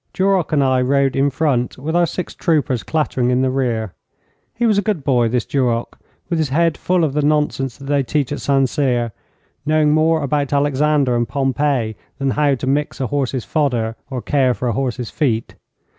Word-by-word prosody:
Duroc 190 -2 +1
and 145 -2 +3
I 130 -1 +2
rode 135 +1 +2
in 135 +1 +2
front, 135 -3 0
with 155 +5 -3
our 175 -1 +3
six 180 - -5
troopers 150 - 0
clattering 130 - -1
in 125 +1 +2
the 130 - +1
rear. 115 -6 -1 0.6
He 235 +1 0
was 215 -3 +3
a - - +2
good 200 -7 -2
boy, 125 -4 +2
this 120 0 0
Duroc, 120 -4 -1 0.3
with 170 -2 -1
his 155 -3 0
head 165 +3 +2
full 180 -1 0
of 150 -4 0
the 150 - +1
nonsense 145 -4 0
that 140 - -11
they 140 0 +1
teach 140 0 -1
at 145 - -4
St 135 -1 +2
Cyr, 125 -4 0 0.5
knowing 155 0 +2
more 155 0 +2
about 145 0 -1
Alexander 145 -2 +2
and 120 0 0
Pompey 135 -4 0 0.2
than 135 -1 0
how 145 0 +2
to 130 - -5
mix 145 +3 -1
a 135 - 0
horse's 135 -2 -2
fodder 120 -8 0
or 130 -3 -5
care 130 -4 +2
for 125 - -3
a - - 0
horse's 125 -1 -3
feet. 115 -8 -1
140 Hz, 200 wpm, -19 LUFS, 125-150 Hz, 0.6 s, and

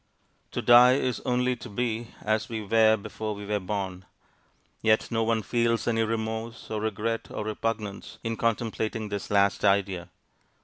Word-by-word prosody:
To - - -2
die 125 +1 +8
is 130 -2 0
only 125 0 +2
to 120 - -9
be 115 +1 -2
as 110 +1 0
we 115 -1 -3
were 110 +1 +5
before 110 +1 -5
we 100 0 -8
were 105 0 0
born; 95 -1 -4 0.8
yet 110 +1 +2
no 115 -1 +1
one 110 -1 +1
feels 115 0 +1
any 115 -1 +2
remorse, 110 +1 -3
or 110 -1 -2
regret, 110 +1 -2
or 105 - -4
repugnance, 110 -2 -4
in 115 -1 -2
contemplating 110 -1 -1
this 100 -1 -4
last 100 -1 +2
idea. 100 -3 +1
110 Hz, 160 wpm, -27 LUFS, 105-115 Hz, 0.8 s, die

